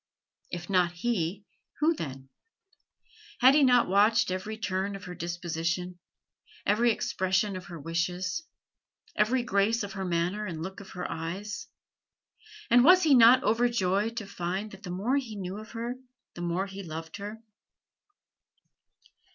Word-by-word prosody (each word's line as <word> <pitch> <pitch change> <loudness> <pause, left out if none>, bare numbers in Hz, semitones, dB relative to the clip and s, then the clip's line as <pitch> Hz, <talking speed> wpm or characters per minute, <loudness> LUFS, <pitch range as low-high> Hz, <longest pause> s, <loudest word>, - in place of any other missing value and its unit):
If 175 -1 -6
not 180 -3 +2
he, 190 -1 -2 0.3
who 315 +3 +4
then? 135 - -7 1.1
Had 260 +2 +7
he 300 - +5
not 250 -2 +5
watched 205 +2 +3
every 200 +4 -4
turn 200 -2 -2
of 195 - -9
her 180 - -7
disposition, 175 +1 -3 0.7
every 230 +3 +3
expression 190 -1 0
of 185 - -7
her 170 -4 -8
wishes, 175 - -2 0.7
every 240 +4 +2
grace 220 0 +1
of 200 -1 -6
her 195 - -4
manner 180 +4 -1
and 165 -3 -5
look 190 +2 -6
of 200 - -11
her 180 -1 -5
eyes? 180 +6 -5 1.0
and 245 0 +7
was 365 +5 +7
he 305 -3 +5
not 245 +1 +7
overjoyed 225 -2 +1
to 220 - -3
find 190 +2 -4
that 195 - -12
the 185 - -8
more 205 +10 0
he 240 -6 -4
knew 190 0 -5
of 215 +1 -11
her 235 +1 -3 0.4
the 175 - -8
more 175 +2 -1
he 195 0 -8
loved 160 0 -7
her? 210 +2 -7
195 Hz, 150 wpm, -28 LUFS, 175-225 Hz, 1.1 s, Had